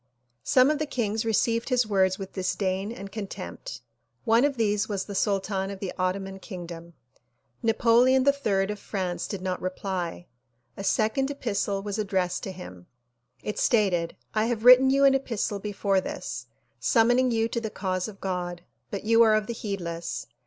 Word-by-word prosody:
Some 260 +3 +5
of 305 - -1
the 305 - -1
kings 225 -4 -1
re 225 - +1
ceived 230 +3 +1
his 250 -2 +3
words 190 -3 +2
with 195 -1 -8
disdain 190 +1 -1
and 200 -4 -8
contempt. 195 - -7 0.4
One 230 +3 +4
of 285 -3 0
these 210 -1 +1
was 200 -2 -2
the 205 - -7
sultan 195 -1 0
of 200 -1 -7
the 190 -2 -4
Ottoman 190 +1 -2
kingdom. 170 -3 -9 0.7
Napoleon 240 +3 +4
HI 250 -9 +2
of 210 - -6
France 185 -4 -3
did 195 -3 -5
not 185 -1 -2
reply. 185 -2 -3 0.5
A 195 - -6
second 220 +7 +1
epistle 205 -7 -2
was 205 +1 -3
addressed 185 -3 0
to 195 - -4
him. 90 - -11 0.6
It 210 - -3
stated 185 -8 +2 0.2
"I 215 0 +2
have 230 -1 -2
written 255 +1 +9
you 275 +1 +4
an 275 - +6
epistle 230 -6 -1
before 200 -1 0
this, - - -6 0.3
summoning 245 +2 +3
you 225 -1 +1
to 235 - -2
the 220 - -3
cause 185 -2 -2
of 200 -3 -10
God 175 -2 -3 0.3
but 200 - -5
you 230 +1 +4
are 220 -2 +6
of 215 -1 +1
the 235 - -4
heedless. 175 -7 -4
205 Hz, 175 wpm, -26 LUFS, 190-230 Hz, 0.7 s, written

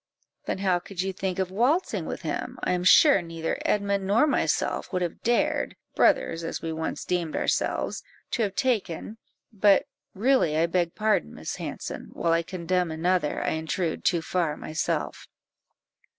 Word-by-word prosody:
"Then - - -1
how 190 -2 +1
could 185 0 -5
you 190 0 -2
think 185 -1 -3
of 190 -1 -1
waltzing 255 - +1
with - - -5
him? - - -3
I - - +1
am 180 0 0
sure 275 - +7
neither 165 -1 -4
Edmund 200 -2 0
nor 215 +9 +4
myself 300 - 0
would 180 -2 0
have 175 - -4
dared 240 +1 +1 0.2
(brothers 165 - +2
as 165 - -3
we 165 -1 -4
once 160 0 -4
deemed 175 -3 -1
ourselves) - - 0 0.3
to 240 - 0
have 200 -3 -1
taken 220 - -1 0.3
but 205 -1 +4 0.3
really 210 - +2
I 165 - +4
beg 170 0 0
pardon, 215 - +1
Miss - - -5
Hanson; - - -6
while 165 -1 +1
I 165 - +3
condemn 180 0 -1
another, 165 0 0
I - - 0
intrude 160 +2 -2
too 170 -2 +2
far 165 -3 -1
myself." 155 0 -3
180 Hz, 165 wpm, -26 LUFS, 165-200 Hz, 0.3 s, sure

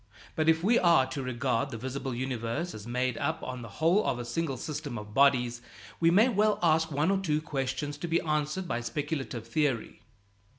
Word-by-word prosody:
But 155 0 +2
if 160 +1 +3
we 230 +5 +4
are 170 -7 +5
to 130 +1 -5
regard 125 0 -1
the 120 - -6
visible 130 +1 -4
universe 130 +6 -3
as 105 +1 -9
made 125 0 -1
up 160 0 -2
on 125 -1 -5
the 115 - -7
whole 170 +7 +3
of 125 - 0
a 120 - -5
single 135 +2 -2
system 145 -2 -5
of 105 0 -8
bodies, 125 -3 +3 0.4
we 165 - +4
may 205 +8 +5
well 210 -3 +2
ask 160 -1 +3
one 150 +6 +1
or 195 - +2
two 155 -6 0
questions 145 0 -3
to 175 - -3
be 165 0 +2
answered 150 +4 -1
by 120 -6 -2
speculative 135 -2 -4
theory. 130 -5 -1
145 Hz, 200 wpm, -29 LUFS, 125-165 Hz, 0.4 s, are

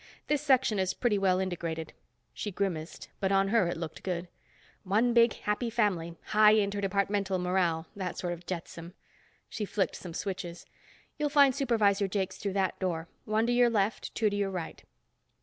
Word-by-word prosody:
This 295 -1 +1
Section 260 -7 +3
is 190 -1 0
pretty 220 -5 +1
well 185 -2 +3
integrated." 170 -4 -3 0.4
She 210 - -4
grimaced, 180 -4 -3
but 195 -1 0
on 195 0 +3
her 220 -4 +3
it 175 - -2
looked 165 -2 -6
good. 180 -1 -3 0.5
"One 215 +5 +2
big 235 -1 +5
happy 210 +3 -2
family. 185 -8 0
High 215 0 +6
interdepartmental 200 -1 0
morale. 180 -3 +1
That 185 -3 -4
sort 175 -1 -2
of 175 0 -11
jetsam." 170 0 -6 0.5
She 220 - -5
flicked 195 -3 -1
some 170 -3 -8
switches. 180 -3 -5 0.5
"You'll 300 -1 +1
find 280 -2 +5
Supervisor 215 -7 +2
Jakes 190 -1 -2
through 200 -2 -3
that 190 -2 0
door, 170 -3 -2 0.2
one 215 +1 +1
to 240 - +1
your 245 0 +5
left, 215 -1 -1
two 215 -2 +2
to - - -2
your 200 -1 0
right." 180 -4 -6
195 Hz, 170 wpm, -30 LUFS, 180-215 Hz, 0.5 s, High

